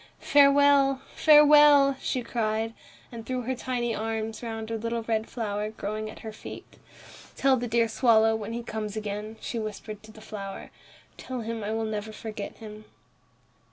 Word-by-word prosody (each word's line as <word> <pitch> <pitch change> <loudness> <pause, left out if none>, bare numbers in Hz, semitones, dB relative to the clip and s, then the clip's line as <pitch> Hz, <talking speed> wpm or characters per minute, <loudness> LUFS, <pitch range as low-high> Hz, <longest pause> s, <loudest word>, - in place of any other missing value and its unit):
"Farewell, 280 -1 +5
farewell!" 295 -2 +7
she 255 - -2
cried, 225 -1 -2 0.4
and 230 -2 -8
threw 255 +1 -3
her 260 +3 -2
tiny 245 -2 -2
arms 220 0 -3
round 225 -1 -5
a - - -1
little 230 +1 -3
red 220 -1 -1
flower 210 -3 -3
growing 215 0 -5
at - - -11
her 220 - -7
feet. - - -11 0.6
"Tell 270 -1 +3
the 245 -1 -3
dear 230 0 +2
swallow, 225 -1 +3
when 220 0 -5
he 235 0 -4
comes 215 -2 -5
again," 210 +1 -5
she 235 - -4
whispered 215 -1 -6
to 215 0 -14
the 215 - -15
flower, 200 -2 -8 0.5
"tell 255 -2 -6
him 225 -1 -4
I 205 - -3
will 225 0 -1
never 215 0 -4
forget 215 -1 -7
him." 215 -1 -11
225 Hz, 165 wpm, -27 LUFS, 215-245 Hz, 0.6 s, farewell